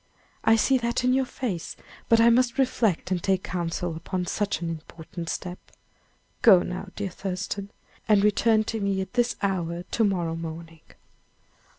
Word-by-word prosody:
I 225 - +5
see 260 +4 +3
that 235 +1 -1
in 250 0 +3
your 265 0 +2
face; 200 -12 -4 0.3
but 230 - +6
I 230 +1 +6
must 245 +1 +2
reflect 230 -9 +1
and 180 -2 0
take 190 0 +1
counsel 175 -1 -3
upon 180 +2 -3
such 200 -1 -1
an 170 - -4
important 165 +1 -8
step. 180 -1 -4 0.8
Go 190 -7 +7
now, 180 +2 -5
dear 200 -2 -3
Thurston, 195 +2 -4 0.4
and 205 -2 +5
return 215 +1 +3
to 225 +1 -3
me 200 -1 0
at 190 - -7
this 245 -1 +1
hour 175 -3 -1
to 225 - -1
morrow 175 -5 0
morning." 165 0 -7
195 Hz, 165 wpm, -26 LUFS, 175-225 Hz, 0.8 s, Go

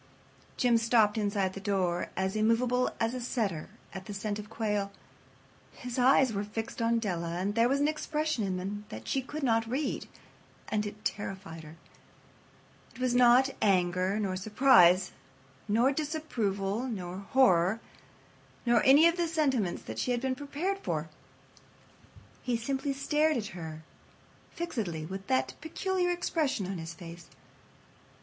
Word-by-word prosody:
Jim 240 -2 +4
stopped 225 -2 +3
inside 200 -3 0
the 195 - -6
door, 190 -4 -1
as 190 +2 -1
immovable 235 +3 +2
as 225 +1 0
a 255 - -3
setter 215 - -2 0.2
at 190 0 -7
the 205 - -6
scent 205 +1 -3
of 210 0 -9
quail. 210 -3 -1 0.8
His 250 0 -5
eyes 260 -1 +5
were 200 0 -1
fixed 225 +3 -5
upon 230 0 +2
Della, 175 -6 -2
and 195 +3 -1
there 230 +2 +3
was 275 +1 +2
an 290 - +3
expression 305 -4 -1
in 190 -2 -1
them 205 +3 -5
that 110 +1 -8
she 270 - 0
could 290 +3 -6
not 225 -3 +2
read, 275 +4 -2 0.6
and 210 -1 0
it 210 +1 -10
terrified 190 -5 -4
her. 155 +1 -12 1.2
It - - -13
was 255 -1 +1
not 250 +2 +5
anger, 185 0 +2
nor 195 -3 -1
surprise, 195 -3 +5 0.6
nor 235 +6 +3
disapproval, 245 - -2
nor 185 -5 -5
horror, 200 -3 +3 0.9
nor 235 -2 +4
any 285 +5 +7
of 335 +1 +1
the 345 -1 +1
sentiments 270 - 0
that - - -6
she - - -1
had 245 -1 +1
been 265 0 0
prepared 295 +9 -3
for. - - -3 1.3
He 245 -2 -1
simply 270 +4 -2
stared 300 +2 +1
at 215 -3 -3
her 160 -3 -7 0.7
fixedly 210 - -4
with 195 +3 -7
that 130 0 +1
peculiar 360 +3 -1
expression 320 - 0
on 185 -1 -4
his 165 0 -7
face. 170 0 -10
225 Hz, 150 wpm, -30 LUFS, 190-265 Hz, 1.3 s, any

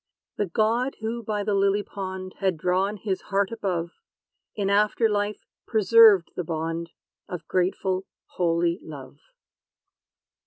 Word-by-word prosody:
The 205 - 0
God 230 +8 +1
who 230 +2 -3
by 210 -2 -2
the 205 0 0
lily 200 +1 +2
pond 190 -2 -6
Had 190 -4 +1
drawn 190 +5 0
his 195 -2 -3
heart 200 0 0
above, 180 -7 -2 0.6
In 200 -2 -1
after 210 +3 +3
life 205 0 -2 0.2
preserved 220 -4 +6
the 180 - -2
bond 165 +1 -3 0.4
Of 180 - -6
grateful, 185 +1 0 0.2
holy 170 -1 0
love. 140 -4 -10
195 Hz, 125 wpm, -25 LUFS, 180-210 Hz, 0.6 s, preserved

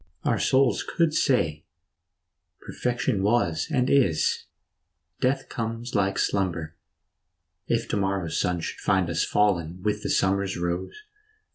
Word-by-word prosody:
Our - - +1
souls 130 -1 +3
could 165 -3 0
say, 80 - +1 0.5
" - - -56
Perfection 120 -5 -1
was 95 -6 +1
and 125 -1 +1
is; 110 - +2 0.7
Death 135 +1 0
comes 115 +1 -4
like 100 -2 +1
slumber," 90 -5 -1 0.9
if - - 0
to - - 0
morrow's 95 -4 -1
sun 90 -2 -1
Should - - -5
find 95 -3 +1
us 80 - +1
fallen 90 -4 0
with 105 0 0
the - - -3
summer's 95 0 +1
rose. 85 - -3
100 Hz, 130 wpm, -26 LUFS, 85-120 Hz, 0.9 s, souls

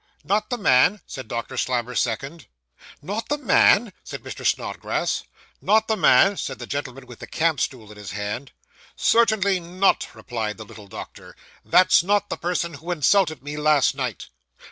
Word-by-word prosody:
'Not 210 +2 0
the 245 - -2
man!' 190 - +4
said 130 -4 -8
Doctor 120 +3 -5
Slammer's 125 -1 -1
second. 135 +7 -4 0.6
'Not 215 +7 -4
the 295 - 0
man!' 230 -5 +4
said - - -8
Mr. - - -8
Snodgrass. - - -1 0.4
'Not 220 +1 +3
the 220 - +1
man!' 195 0 +5
said 135 - -4
the 120 - -7
gentleman 135 -1 -5
with 125 -2 -13
the - - -9
camp 160 -1 0
stool 110 -5 -4
in 105 - -13
his 100 -3 -8
hand. 105 +6 -5 0.4
'Certainly 215 -5 +3
not,' 180 +3 +1
replied 110 -4 -4
the 110 - -9
little 105 0 -13
doctor. - - -10 0.3
'That's 185 -2 +5
not 205 +3 0
the - - -2
person 170 -1 -2
who 160 +4 -10
insulted 170 0 +2
me 145 +1 -6
last 150 -2 +3
night. 130 - -5
150 Hz, 165 wpm, -23 LUFS, 125-195 Hz, 0.6 s, man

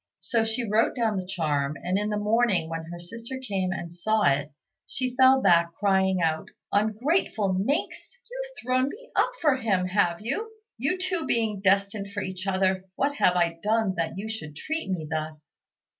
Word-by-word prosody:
So 230 -2 +1
she 225 +1 -2
wrote 215 +2 +2
down 225 -5 +1
the 185 -1 -4
charm, 150 -5 -1
and 180 +2 0
in 210 +1 0
the 210 - -1
morning 210 -5 +2
when 165 0 -4
her 175 +1 -8
sister 230 +8 -7
came 195 -8 -2
and 170 -2 -5
saw 215 +5 +1
it, 145 +1 +2 0.4
she 255 -1 -3
fell 260 +1 +6
back, 170 -1 +4
crying 190 -2 +2
out, 160 -1 0 0.2
"Ungrateful 220 - +1
minx! 265 - -2
you've - - -7
thrown 255 +1 +2
me - - -11
up - - +3
for 295 -5 +3
him, 200 -7 +1
have 175 -3 +2
you? 430 - -3 0.3
You 280 +10 0
two 365 -3 -2
being 220 -4 0
destined 200 +1 +2
for 205 -2 -2
each 185 +1 -5
other, 190 0 +1
what 285 +1 0
have 180 - +4
I 170 -1 +1
done 215 -2 +1
that 165 +2 -2
you 205 +3 -4
should 160 -10 -6
treat 315 - -4
me 175 -4 -2
thus?" 155 -1 -5
200 Hz, 185 wpm, -26 LUFS, 175-240 Hz, 0.4 s, fell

